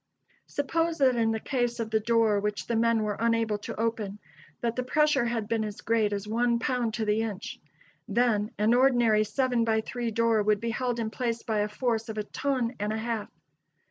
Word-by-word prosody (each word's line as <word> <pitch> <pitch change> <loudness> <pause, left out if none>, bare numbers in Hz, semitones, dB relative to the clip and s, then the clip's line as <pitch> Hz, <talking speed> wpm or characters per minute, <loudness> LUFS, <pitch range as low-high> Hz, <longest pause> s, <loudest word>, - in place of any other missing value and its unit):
Suppose 330 +3 -1
that 260 -3 +4
in 230 -1 +2
the 220 0 0
case 240 -1 -1
of 225 -1 -3
the 220 - +3
door 225 -1 +2
which 210 0 -2
the 235 - -1
men 230 -1 +2
were 210 -1 -2
unable 230 -2 +1
to 205 - -7
open, 220 -3 -2 0.4
that 235 -1 -1
the 255 - 0
pressure 285 0 +2
had 235 -3 -2
been 225 -1 0
as 210 -1 -6
great 220 -2 +1
as 205 0 -3
one 235 +2 +1
pound 240 -2 -1
to 225 - -1
the 210 +1 +1
inch. 210 -3 -5 0.5
Then 215 -2 +1
an 215 +3 +3
ordinary 240 -4 +4
seven 245 +2 0
by 220 -1 +2
three 240 +1 -3
door 230 -1 +2
would 210 0 +2
be 230 0 -2
held 245 0 -2
in 220 -1 -2
place 235 -1 -2
by 220 -2 -1
a 205 0 0
force 225 0 -1
of 220 - -5
a 210 - -1
ton 255 0 -1
and 210 +1 -1
a 220 - -2
half. 225 -1 -3
230 Hz, 210 wpm, -28 LUFS, 215-240 Hz, 0.5 s, that